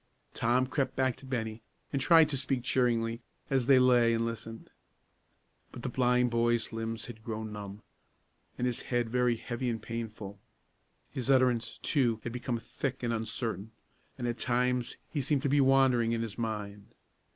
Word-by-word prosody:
Tom 125 Hz, +3 st, +2 dB
crept 135 Hz, +1 st, -1 dB
back 130 Hz, -2 st, +1 dB
to 135 Hz, -, -12 dB
Bennie, 110 Hz, -3 st, -3 dB, 0.3 s
and 140 Hz, -, 0 dB
tried 160 Hz, +2 st, +6 dB
to 145 Hz, -, -1 dB
speak 130 Hz, -1 st, -1 dB
cheeringly, 115 Hz, -2 st, +1 dB, 0.3 s
as 130 Hz, -3 st, +2 dB
they 135 Hz, -1 st, +7 dB
lay 120 Hz, -2 st, +5 dB
and 115 Hz, 0 st, 0 dB
listened. 115 Hz, -1 st, -6 dB, 1.0 s
But -, -, -9 dB
the -, -, -2 dB
blind 125 Hz, -1 st, +2 dB
boy's 120 Hz, 0 st, +1 dB
limbs 115 Hz, 0 st, -4 dB
had 110 Hz, -2 st, -10 dB
grown 110 Hz, -1 st, -5 dB
numb, 100 Hz, 0 st, -8 dB, 0.7 s
and 125 Hz, -, -1 dB
his 125 Hz, -2 st, -1 dB
head 120 Hz, -2 st, -1 dB
very 125 Hz, -1 st, +2 dB
heavy 120 Hz, +2 st, -3 dB
and 115 Hz, -1 st, -2 dB
painful. 110 Hz, -3 st, -6 dB, 0.7 s
His 130 Hz, 0 st, -4 dB
utterance, 125 Hz, -4 st, +3 dB
too, 120 Hz, -7 st, +2 dB
had 120 Hz, -, -4 dB
become 125 Hz, -1 st, -2 dB
thick 130 Hz, +2 st, -4 dB
and 120 Hz, -1 st, 0 dB
uncertain, 110 Hz, -1 st, -3 dB, 0.4 s
and 120 Hz, -2 st, -2 dB
at 120 Hz, 0 st, -3 dB
times 125 Hz, 0 st, 0 dB, 0.2 s
he 145 Hz, -, 0 dB
seemed 140 Hz, 0 st, +1 dB
to 140 Hz, -, +1 dB
be 145 Hz, +1 st, +4 dB
wandering 130 Hz, -3 st, +4 dB
in 115 Hz, 0 st, 0 dB
his 110 Hz, -3 st, -5 dB
mind. 105 Hz, -3 st, -5 dB
120 Hz, 170 wpm, -30 LUFS, 115-130 Hz, 1.0 s, they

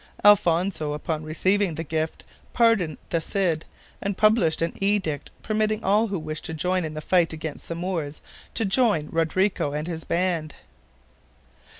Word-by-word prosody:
Alfonso, 175 Hz, -5 st, +4 dB
upon 150 Hz, +1 st, -3 dB
receiving 185 Hz, +4 st, +1 dB
the 165 Hz, -, -3 dB
gift, 160 Hz, 0 st, -3 dB, 0.3 s
pardoned 225 Hz, -, +3 dB
the 165 Hz, -, +1 dB
Cid, 170 Hz, -3 st, 0 dB, 0.4 s
and 200 Hz, -1 st, -2 dB
published 215 Hz, -7 st, +3 dB
an 165 Hz, -, -1 dB
edict 195 Hz, -8 st, 0 dB
permitting 215 Hz, 0 st, 0 dB
all 210 Hz, +4 st, +3 dB
who 200 Hz, -2 st, -2 dB
wished 155 Hz, -1 st, -5 dB
to 160 Hz, -, -3 dB
join 180 Hz, +3 st, 0 dB
in 155 Hz, -1 st, -5 dB
the 155 Hz, -, -4 dB
fight 170 Hz, -1 st, +2 dB
against 160 Hz, -2 st, -6 dB
the 165 Hz, -, -4 dB
Moors 165 Hz, -4 st, -3 dB, 0.4 s
to 225 Hz, -, +1 dB
join 195 Hz, -, +2 dB
Rodrigo 165 Hz, -1 st, +1 dB
and 150 Hz, +2 st, -3 dB
his 165 Hz, -2 st, -4 dB
band. 170 Hz, -3 st, -1 dB
170 Hz, 155 wpm, -25 LUFS, 155-200 Hz, 0.4 s, Alfonso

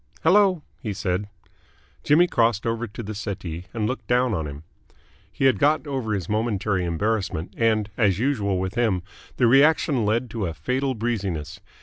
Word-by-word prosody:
"Hello," 185 Hz, -1 st, +4 dB, 0.2 s
he 110 Hz, -6 st, -3 dB
said. 95 Hz, +1 st, -2 dB, 0.7 s
Jimmy 160 Hz, +4 st, +5 dB
crossed 115 Hz, -, +1 dB
over 115 Hz, +1 st, -1 dB
to 110 Hz, +3 st, -8 dB
the 110 Hz, +1 st, -5 dB
settee, 95 Hz, -5 st, -5 dB
and 110 Hz, -3 st, -2 dB
looked 130 Hz, +5 st, -3 dB
down 125 Hz, -1 st, +2 dB
on 80 Hz, -6 st, -2 dB
him. 70 Hz, +1 st, -8 dB, 0.7 s
He 135 Hz, -, -1 dB
had 130 Hz, -, +4 dB
got 155 Hz, +1 st, +3 dB
over 130 Hz, -7 st, -2 dB
his 95 Hz, -4 st, -4 dB
momentary 105 Hz, -3 st, 0 dB
embarrassment, 95 Hz, -1 st, -2 dB
and, 110 Hz, -2 st, +2 dB
as 100 Hz, -6 st, +3 dB
usual 105 Hz, -6 st, 0 dB
with 95 Hz, 0 st, -3 dB
him, 110 Hz, -7 st, +1 dB, 0.3 s
the 125 Hz, -, +3 dB
reaction 135 Hz, 0 st, +4 dB
led 115 Hz, +3 st, 0 dB
to 110 Hz, -5 st, -2 dB
a 80 Hz, -, -5 dB
fatal 130 Hz, -, -1 dB
breeziness. 95 Hz, -9 st, -3 dB
110 Hz, 165 wpm, -24 LUFS, 95-125 Hz, 0.7 s, Jimmy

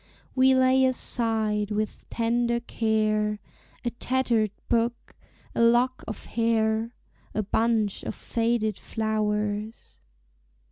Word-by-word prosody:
We 260 Hz, 0 st, +5 dB
lay 260 Hz, 0 st, +4 dB
aside 220 Hz, -5 st, 0 dB
with 215 Hz, 0 st, -3 dB
tender 235 Hz, +1 st, +1 dB
care 215 Hz, -2 st, 0 dB, 0.5 s
A 240 Hz, -, 0 dB
tattered 240 Hz, -3 st, +1 dB, 0.2 s
book, 235 Hz, 0 st, -1 dB, 0.4 s
a -, -, 0 dB
lock 240 Hz, +2 st, +3 dB
of 220 Hz, -, -6 dB
hair, 225 Hz, 0 st, 0 dB, 0.4 s
A 215 Hz, -, +1 dB
bunch 220 Hz, 0 st, +1 dB
of -, -, -5 dB
faded 225 Hz, -3 st, -1 dB
flowers. 215 Hz, 0 st, -2 dB
225 Hz, 100 wpm, -26 LUFS, 215-240 Hz, 0.5 s, We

